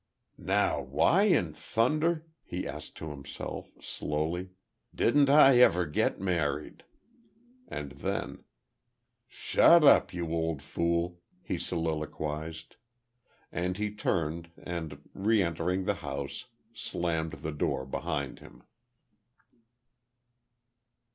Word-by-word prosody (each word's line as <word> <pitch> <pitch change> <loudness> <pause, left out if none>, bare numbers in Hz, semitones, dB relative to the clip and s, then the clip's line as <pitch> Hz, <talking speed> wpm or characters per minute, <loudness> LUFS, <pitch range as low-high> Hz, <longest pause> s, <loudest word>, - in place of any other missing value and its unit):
"Now - - +1
why 70 - +3
in 90 - +2
thunder," 155 - 0 0.2
he - - -4
asked - - -8
of 80 - -4
himself, 70 -1 -7
slowly, 80 +5 -2 0.5
"didn't 140 +3 +4
I 135 -3 +8
ever 90 -7 +5
get 75 -1 0
married?" 85 -7 -1 0.9
And 70 -2 -5
then, 70 - -4 0.8
"Shut 170 +6 +5
up, 145 - +6
you 85 -2 -4
old 80 -4 -1
fool," 85 +2 -1 0.2
he - - -3
soliloquized. 80 -1 -4 0.7
And 90 +1 -2
he 105 0 -2
turned, 85 -4 -1
and, 80 -4 -6
re 105 +1 +2
entering 85 +2 -1
the - - +1
house, 70 0 -5 0.3
slammed 85 -8 -2
the 75 +1 -5
door 70 -2 -1
behind 70 -1 -3
him. - - -15
85 Hz, 100 wpm, -30 LUFS, 75-95 Hz, 0.9 s, I